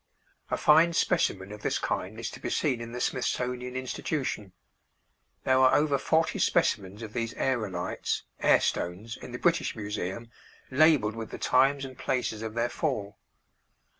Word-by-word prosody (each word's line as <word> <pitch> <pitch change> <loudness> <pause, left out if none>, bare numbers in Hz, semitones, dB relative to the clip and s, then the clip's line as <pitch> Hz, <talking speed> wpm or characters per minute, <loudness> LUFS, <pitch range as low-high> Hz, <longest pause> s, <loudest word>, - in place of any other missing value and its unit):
A - - 0
fine 160 +3 +5
specimen 100 - +1
of 105 0 -9
this - - 0
kind 105 +5 -3
is 115 0 -4
to - - -10
be - - -4
seen 130 -6 0
in 115 0 -7
the 125 - -5
Smithsonian 125 0 -2
Institution. 130 -4 -3 0.9
There 130 0 +3
are 130 0 +6
over 145 -2 +2
forty 160 +4 +1
specimens 100 +3 +1
of 110 -1 -8
these 115 -1 -2
aërolites 105 -9 -1 0.2
(air - - +5
stones) 100 +7 -2
in - - -10
the 120 - -4
British 170 +5 +1
Museum, 105 +1 -4 0.4
labeled 135 -6 +4
with 115 -1 -6
the - - -7
times 135 +2 +3
and 130 -1 -9
places 125 -4 -2
of 110 0 -5
their 120 +1 +1
fall. 120 -8 -3
120 Hz, 160 wpm, -28 LUFS, 105-135 Hz, 0.9 s, are